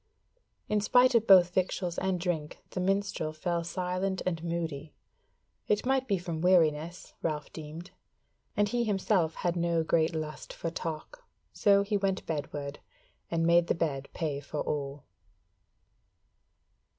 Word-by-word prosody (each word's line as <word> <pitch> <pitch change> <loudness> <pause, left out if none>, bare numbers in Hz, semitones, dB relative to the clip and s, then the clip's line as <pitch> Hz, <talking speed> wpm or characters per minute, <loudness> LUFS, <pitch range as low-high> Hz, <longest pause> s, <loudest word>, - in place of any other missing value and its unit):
In 210 -1 +1
spite 250 +4 +5
of 230 -1 +3
both 180 -2 +7
victuals 180 -1 -1
and 190 -1 0
drink 165 -4 -2
the - - -3
minstrel 195 -4 0
fell 170 +2 -1
silent 185 +2 -2
and 170 -3 -2
moody; 165 -3 -4 0.7
it 210 +2 +1
might 265 0 +1
be 200 -4 +2
from 170 -3 -4
weariness, 170 -1 +2
Ralph 150 -2 -3
deemed; 160 +3 -8 0.7
and 205 0 +3
he 240 +3 0
himself 195 -6 +1
had 175 -1 -1
no 170 -1 +1
great 160 0 +2
lust 155 -1 -5
for 165 - -4
talk, 165 - -6 0.3
so 200 -1 +4
he 205 +1 0
went 195 -1 -1
bedward, 145 -2 -4 0.5
and 165 -1 +1
made 170 0 +5
the - - +1
bed 140 -5 -2
pay 150 -4 -2
for 145 +1 -5
all. 140 -1 -3
170 Hz, 140 wpm, -30 LUFS, 160-195 Hz, 0.7 s, both